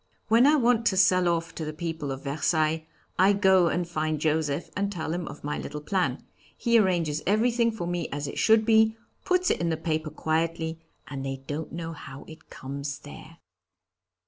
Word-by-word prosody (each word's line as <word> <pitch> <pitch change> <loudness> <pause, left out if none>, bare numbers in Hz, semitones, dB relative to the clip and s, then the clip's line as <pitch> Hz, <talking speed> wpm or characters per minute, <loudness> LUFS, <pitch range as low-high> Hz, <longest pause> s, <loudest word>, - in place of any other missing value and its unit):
When 230 +4 +6
I 300 - +6
want 235 -4 +3
to 190 - +1
sell 185 -2 +4
off 165 -1 -1
to 160 - -5
the 155 0 -4
people 160 -3 -4
of 135 0 -6
Versailles, 155 +2 0 0.3
I 195 +2 +6
go 190 -3 +4
and 175 +1 -1
find 155 -2 -2
Joseph 155 0 -1
and 200 +1 -1
tell 160 -4 -3
him 175 -1 -3
of - - -9
my 150 +1 -3
little 150 +1 -6
plan. 185 +5 -1 0.3
He 235 -1 +3
arranges 170 -7 +1
everything 230 +3 +3
for 220 -6 -5
me 175 -1 -2
as 145 0 -3
it - - -5
should 220 0 +4
be, 220 0 +4 0.3
puts 365 -1 +2
it - - -1
in 170 - 0
the 160 - 0
paper 155 -1 -2
quietly, 160 +1 -2 0.3
and 135 -1 -6
they 135 0 -5
don't 150 +3 -5
know 165 0 -5
how 135 -3 -10
it 160 -1 -14
comes 140 +2 -6
there!" 155 +3 -12
165 Hz, 195 wpm, -27 LUFS, 155-195 Hz, 0.3 s, When